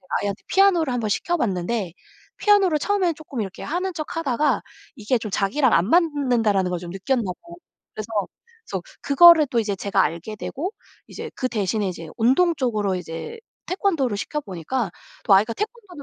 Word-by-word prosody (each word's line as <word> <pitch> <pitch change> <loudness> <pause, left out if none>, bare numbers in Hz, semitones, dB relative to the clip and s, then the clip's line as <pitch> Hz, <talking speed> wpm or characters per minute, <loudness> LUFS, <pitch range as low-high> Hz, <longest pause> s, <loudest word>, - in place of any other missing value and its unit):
이제 180 - -26
아이한테 200 0 -3
피아노를 360 -8 +3
한번 235 -3 -1
시켜 345 - 0
봤는데 195 - -1 0.5
피아노를 390 -7 +4
처음에는 375 -4 +1
쪼끔 290 -5 -7
이렇게 195 -3 -5
하는 365 +4 -2
척하다가 305 -3 0 0.4
이게 235 +3 0
좀 220 -2 -6
자기랑 220 +7 +1
안 180 +5 +3
맞는다라는 250 - +2
걸 180 - -2
좀 175 -1 -8
느꼈나 235 +7 -1
봐요. 340 - -7 0.4
그래서 215 0 -6 0.6
그래서 - - -4 0.2
그거를 320 +2 +7
또 235 -3 +2
이제 205 -2 -2
제가 195 0 0
알게 170 +7 -3
되고 330 - -4 0.3
이제 - - -8
그 255 - -1
대신에 210 -1 -1
이제 170 -3 -7
운동 265 +10 +3
쪽으로 215 -7 0
이제 180 - -7 0.3
태권도를 330 - 0
시켜 300 +8 -3
보니까 195 - -3 0.3
또 200 - +5
아이가 215 +4 +4
태권도는 415 - -6
245 Hz, 395 characters per minute, -23 LUFS, 200-330 Hz, 0.6 s, 그거를